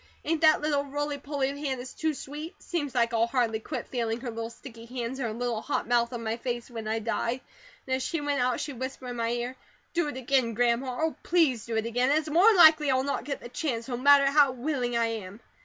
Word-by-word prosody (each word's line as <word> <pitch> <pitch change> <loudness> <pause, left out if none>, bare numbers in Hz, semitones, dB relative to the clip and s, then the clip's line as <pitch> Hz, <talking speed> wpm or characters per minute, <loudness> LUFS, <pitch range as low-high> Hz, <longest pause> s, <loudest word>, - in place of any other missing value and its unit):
Ain't 325 0 0
that 310 -2 +5
little 295 -2 +1
roly 290 +1 -3
poly 275 -1 -1
of 280 - -8
Hannah's 265 -3 -4
too 315 -1 -1
sweet? 295 +5 -7
Seems 290 -7 -4
like 235 -1 +2
I'll 230 0 +3
hardly 235 -3 0
quit - - -5
feeling 235 -2 -2
her 245 -2 -4
little 225 0 -4
sticky 230 -1 -12
hands 250 +1 -4
and 245 - -1
her - - -3
little 240 -2 -2
hot 285 - -2
mouth 235 0 +2
on 240 -2 -5
my 220 +1 -2
face 240 0 -4
when 225 -2 -6
I 220 +1 0
die; 230 +2 -1 0.5
and 260 - 0
as - - -5
she 330 +5 -2
went 290 -2 0
out 250 0 +1
she 290 - -4
whispered 260 0 -6
in 240 - -6
my 230 0 0
ear: 240 +2 -2 0.4
'Do 345 -2 +1
it 290 - -5
again, 255 -3 +1
Grandma, 245 +2 +1
Oh, 320 0 0
please 305 - +2
do 225 -1 -1
it 220 - 0
again!' 245 +3 +1
an 290 - +4
it's 315 0 -2
more'n 385 +6 +6
likely 315 -3 +7
I'll 260 0 +2
not 280 - -2
get 280 -2 -4
the 240 - -9
chance, 245 -3 -3
no 250 - -2
matter 280 +2 +6
how 280 -1 +4
willing 250 -2 -1
I 230 - +3
am. 215 -3 -5
255 Hz, 245 wpm, -28 LUFS, 235-285 Hz, 0.5 s, likely